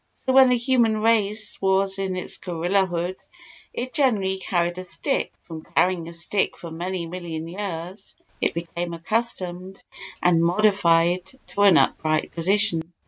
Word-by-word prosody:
So 260 Hz, -, +1 dB
when 265 Hz, -1 st, +7 dB
the 250 Hz, -, +3 dB
human 235 Hz, -3 st, +2 dB
race 220 Hz, -1 st, +2 dB
was 195 Hz, 0 st, +2 dB
in 190 Hz, -1 st, -2 dB
its 180 Hz, -, -4 dB
gorilla 180 Hz, +3 st, 0 dB
hood 175 Hz, +1 st, -3 dB, 0.5 s
it 255 Hz, +1 st, -5 dB
generally 205 Hz, -10 st, +1 dB
carried 175 Hz, -1 st, -1 dB
a -, -, -5 dB
stick; 270 Hz, -, -1 dB
from 160 Hz, -2 st, -8 dB
carrying 180 Hz, -2 st, +2 dB
a -, -, -10 dB
stick 170 Hz, +4 st, -1 dB
for 170 Hz, -, -9 dB
many 175 Hz, +2 st, -4 dB
million 165 Hz, -2 st, -6 dB
years 185 Hz, +1 st, -6 dB, 0.3 s
it -, -, 0 dB
became 170 Hz, 0 st, -4 dB
accustomed 185 Hz, -1 st, -2 dB, 0.4 s
and 170 Hz, -2 st, +3 dB
modified 175 Hz, -2 st, +3 dB, 0.3 s
to 205 Hz, -, -2 dB
an 200 Hz, -4 st, +7 dB
upright 155 Hz, 0 st, +1 dB
position. 175 Hz, -1 st, +1 dB
185 Hz, 145 wpm, -23 LUFS, 170-205 Hz, 0.5 s, when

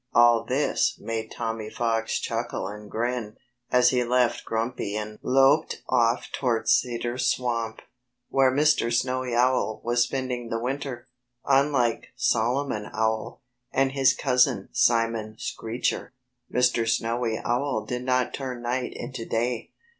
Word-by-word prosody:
All 120 Hz, -1 st, +6 dB
this 130 Hz, +5 st, +1 dB
made 110 Hz, -1 st, -4 dB
Tommy 115 Hz, -2 st, -4 dB
Fox 115 Hz, -1 st, -1 dB
chuckle 115 Hz, -3 st, -3 dB
and 105 Hz, +1 st, -9 dB
grin, 115 Hz, -1 st, -3 dB, 0.3 s
as 125 Hz, -1 st, +5 dB
he 125 Hz, -1 st, +2 dB
left 125 Hz, 0 st, +1 dB
Grumpy 115 Hz, -2 st, -2 dB
and 105 Hz, 0 st, -5 dB
loped 135 Hz, +4 st, +3 dB
off 120 Hz, -1 st, +2 dB
towards 120 Hz, -4 st, 0 dB
Cedar 120 Hz, 0 st, 0 dB
Swamp, 120 Hz, -3 st, -1 dB, 0.4 s
where 135 Hz, -1 st, +3 dB
Mr. 145 Hz, -4 st, +3 dB
Snowy 125 Hz, 0 st, 0 dB
Owl 125 Hz, -3 st, +2 dB
was 120 Hz, +1 st, +1 dB
spending 125 Hz, -2 st, -2 dB
the 115 Hz, -, -1 dB
winter. 130 Hz, 0 st, -4 dB, 0.4 s
Unlike 135 Hz, -4 st, +2 dB
Solomon 120 Hz, -1 st, 0 dB
Owl, 110 Hz, +1 st, -2 dB, 0.3 s
and 135 Hz, 0 st, +2 dB
his 135 Hz, -1 st, +3 dB
cousin 125 Hz, -8 st, +2 dB
Simon 115 Hz, -2 st, +1 dB
Screecher, 115 Hz, +4 st, -3 dB, 0.4 s
Mr. 125 Hz, -2 st, +2 dB
Snowy 115 Hz, 0 st, 0 dB
Owl 120 Hz, -2 st, -1 dB
did 125 Hz, +2 st, -3 dB
not 130 Hz, -1 st, +1 dB
turn 130 Hz, -3 st, -5 dB
night 125 Hz, +1 st, -2 dB
into 125 Hz, -1 st, -6 dB
day. 115 Hz, +1 st, -2 dB
120 Hz, 130 wpm, -26 LUFS, 115-130 Hz, 0.4 s, All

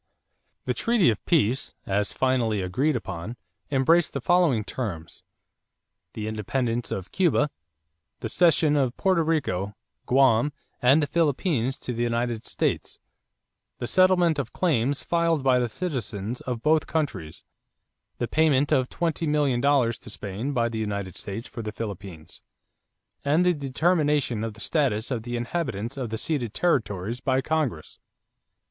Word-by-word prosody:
= -, -, -49 dB
The -, -, 0 dB
treaty 230 Hz, -, +3 dB
of 105 Hz, -, -5 dB
peace, 135 Hz, -6 st, +1 dB
as 100 Hz, +1 st, 0 dB
finally 125 Hz, -5 st, +1 dB
agreed 125 Hz, +11 st, 0 dB
upon, 110 Hz, 0 st, -5 dB, 0.3 s
embraced 150 Hz, +5 st, +3 dB
the 140 Hz, -, -2 dB
following 160 Hz, -6 st, +3 dB
terms: 95 Hz, -9 st, -5 dB, 0.9 s
the 110 Hz, -1 st, -4 dB
independence 115 Hz, +2 st, -2 dB
of 95 Hz, -1 st, -5 dB
Cuba; 160 Hz, -5 st, +2 dB, 0.7 s
the -, -, -2 dB
cession 155 Hz, +2 st, +3 dB
of 130 Hz, -4 st, +1 dB
Porto 185 Hz, -3 st, +2 dB
Rico, 120 Hz, -, -1 dB, 0.3 s
Guam, 130 Hz, +1 st, +4 dB, 0.3 s
and 135 Hz, +5 st, +5 dB
the -, -, +2 dB
Philippines 145 Hz, -, 0 dB
to 125 Hz, -, -3 dB
the 120 Hz, -, -3 dB
United 120 Hz, -1 st, -1 dB
States; -, -, -2 dB, 0.8 s
the -, -, -4 dB
settlement 180 Hz, 0 st, +4 dB
of 140 Hz, -, -3 dB
claims 145 Hz, -5 st, 0 dB
filed 170 Hz, -4 st, +1 dB
by 130 Hz, -2 st, +4 dB
the 120 Hz, -1 st, 0 dB
citizens 120 Hz, -, -3 dB
of 120 Hz, -2 st, -3 dB
both 155 Hz, 0 st, +3 dB
countries; 140 Hz, -, -3 dB, 0.7 s
the 120 Hz, -, -2 dB
payment 145 Hz, -1 st, +2 dB
of 130 Hz, -4 st, +2 dB
twenty 165 Hz, -1 st, -1 dB
million 145 Hz, -5 st, +2 dB
dollars 135 Hz, -5 st, +2 dB
to 120 Hz, -, -11 dB
Spain 105 Hz, +6 st, -4 dB
by 120 Hz, -4 st, +1 dB
the 115 Hz, -1 st, -4 dB
United 100 Hz, -4 st, -3 dB
States 105 Hz, +4 st, -6 dB
for 120 Hz, -, -7 dB
the 110 Hz, -1 st, -4 dB
Philippines; 100 Hz, -7 st, -8 dB, 0.8 s
and 155 Hz, +5 st, +3 dB
the 180 Hz, -, +4 dB
determination 145 Hz, -4 st, +1 dB
of 115 Hz, -2 st, -4 dB
the 110 Hz, -, -11 dB
status 125 Hz, -6 st, 0 dB
of 120 Hz, -3 st, -1 dB
the 120 Hz, +2 st, -5 dB
inhabitants 120 Hz, -, -3 dB
of 130 Hz, -4 st, -4 dB
the 110 Hz, -, -3 dB
ceded 125 Hz, -5 st, -2 dB
territories 115 Hz, -, 0 dB
by 130 Hz, 0 st, +1 dB
Congress. 135 Hz, -, -2 dB
130 Hz, 150 wpm, -25 LUFS, 110-150 Hz, 0.9 s, and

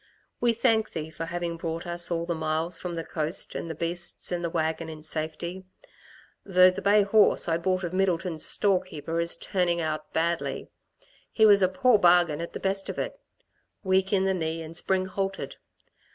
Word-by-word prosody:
We 240 Hz, -1 st, +3 dB
thank 220 Hz, -1 st, +1 dB
Thee 160 Hz, 0 st, -5 dB
for 165 Hz, +1 st, -5 dB
having 170 Hz, 0 st, -4 dB
brought 165 Hz, +1 st, -4 dB
us 175 Hz, 0 st, -3 dB
all 170 Hz, -1 st, -1 dB
the 170 Hz, -, -1 dB
miles 160 Hz, +1 st, -2 dB
from 175 Hz, +1 st, -5 dB
the 165 Hz, -, -3 dB
coast, 160 Hz, +1 st, -2 dB
and 165 Hz, -, -5 dB
the 160 Hz, -, -4 dB
beasts 170 Hz, +3 st, -4 dB
and 175 Hz, -1 st, -2 dB
the 170 Hz, -, -1 dB
wagon, 160 Hz, 0 st, -2 dB
in 155 Hz, -1 st, -9 dB
safety 160 Hz, +4 st, -4 dB, 0.8 s
though 185 Hz, -1 st, +5 dB
the -, -, -6 dB
bay 205 Hz, +1 st, +4 dB
horse 205 Hz, -1 st, +4 dB
I 165 Hz, 0 st, +1 dB
bought 185 Hz, +2 st, 0 dB
of 175 Hz, 0 st, -4 dB
Middleton's 180 Hz, -3 st, 0 dB
storekeeper 170 Hz, -5 st, 0 dB
is 170 Hz, 0 st, +3 dB
turning 175 Hz, -2 st, 0 dB
out 155 Hz, -1 st, -3 dB
badly. 170 Hz, +1 st, -2 dB, 0.6 s
He 220 Hz, -, +4 dB
was 205 Hz, -2 st, +6 dB
a 185 Hz, -, +4 dB
poor 250 Hz, +2 st, +3 dB
bargain 175 Hz, -4 st, +4 dB
at 170 Hz, -, -6 dB
the -, -, -5 dB
best 195 Hz, 0 st, -1 dB
of -, -, -5 dB
it -, -, -3 dB, 0.7 s
weak 190 Hz, 0 st, +2 dB
in 190 Hz, -2 st, +2 dB
the 190 Hz, -, +2 dB
knee 165 Hz, -2 st, -3 dB
and 160 Hz, +1 st, -10 dB
spring 185 Hz, +2 st, 0 dB
halted. 195 Hz, +1 st, -4 dB
175 Hz, 190 wpm, -27 LUFS, 165-190 Hz, 0.8 s, was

